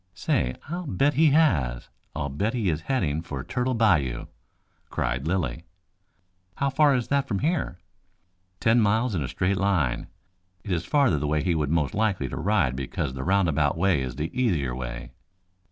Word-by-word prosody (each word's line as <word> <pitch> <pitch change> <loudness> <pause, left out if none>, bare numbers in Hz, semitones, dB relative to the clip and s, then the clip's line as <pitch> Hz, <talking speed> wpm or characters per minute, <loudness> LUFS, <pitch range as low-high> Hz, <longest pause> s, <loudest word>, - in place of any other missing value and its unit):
"Say, 65 0 0
I'll 175 +2 -4
bet 140 +9 +2
he 160 +2 +4
has. 80 - +2 0.3
I'll 70 -1 -2
bet 100 - -1
he 110 -6 0
is 75 0 -3
heading 80 - 0
for 70 -6 -6
Turtle 125 - -1
Bayou," 80 - +2 0.6
cried 65 +4 -2
Lilly. 80 -6 -1 0.9
"How 140 0 0
far 145 0 +4
is 125 -2 -2
that 140 0 +1
from 100 - -1
here?" 150 - -1 0.8
"Ten 115 +1 +4
miles 110 +3 +2
in 85 - -1
a 65 - -2
straight 95 +7 0
line. 95 -10 0 0.6
It 100 - -6
is 85 -1 -1
farther 135 - +3
the 75 - -2
way 75 0 +1
he 90 - +1
would 75 -3 0
be 80 - +1
most 75 -5 0
likely 105 -9 0
to - - -5
ride 90 -8 +1
because 65 +1 -3
the 65 0 -5
roundabout 80 -6 +2
way 90 -4 +2
is 65 -1 -4
the 75 +4 -3
easier 85 - +1
way." - - -6
90 Hz, 180 wpm, -26 LUFS, 70-115 Hz, 0.9 s, he